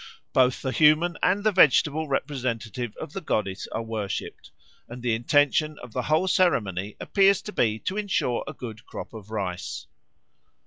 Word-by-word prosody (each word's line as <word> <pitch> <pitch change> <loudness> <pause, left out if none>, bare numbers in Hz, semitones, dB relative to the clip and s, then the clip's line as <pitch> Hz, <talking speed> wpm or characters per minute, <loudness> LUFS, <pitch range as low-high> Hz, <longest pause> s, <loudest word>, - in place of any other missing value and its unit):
Both 130 -1 +3
the 130 - -1
human 155 +4 +4
and 195 +3 +2
the 215 - +3
vegetable 155 -3 +4
representative 125 -5 -3
of - - -7
the 195 - -4
goddess 105 - -2
are 115 - -3
worshipped, 110 -3 -5 0.4
and 120 +1 -9
the 120 -2 +1
intention 145 +5 +2
of 125 -3 -11
the 125 - -1
whole 155 +8 +1
ceremony 105 - +1
appears 195 -1 +3
to 210 - -6
be 110 -2 +1
to 190 - -3
ensure 195 - 0
a 140 - -5
good 115 -5 -8
crop - - -8
of 110 -2 -10
rice. 90 -8 -4
125 Hz, 165 wpm, -25 LUFS, 110-155 Hz, 0.4 s, human